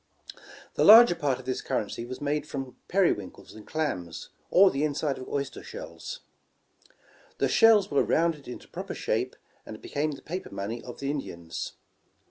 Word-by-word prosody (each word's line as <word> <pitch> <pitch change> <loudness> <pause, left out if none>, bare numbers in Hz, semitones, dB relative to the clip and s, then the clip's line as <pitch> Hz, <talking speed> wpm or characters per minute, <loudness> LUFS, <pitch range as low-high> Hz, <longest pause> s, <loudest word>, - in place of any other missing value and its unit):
The - - +1
larger 225 -1 +10
part 140 -6 0
of 130 - -12
this 130 0 -2
currency 115 +2 -3
was 130 +1 -7
made 150 +1 -1
from 135 -3 -6
peri 190 -2 +4
winkles 100 -3 -7
and 110 - -13
clams, 90 - -3 0.2
or 190 +1 +6
the 140 +2 -1
inside 145 -2 -1
of 130 - -8
oyster 140 -1 -3
shells. - - -8 1.2
The - - +2
shells 225 -5 +5
were 140 - +3
rounded 160 -3 +1
into 125 - -8
proper - - -6
shape, - - -1 0.3
and 110 - -9
became 150 +1 -2
the 140 - -11
paper 180 +4 -5
money 110 +4 -5
of 125 - -9
the 140 0 -1
Indians. 85 - -5
140 Hz, 165 wpm, -27 LUFS, 125-165 Hz, 1.2 s, larger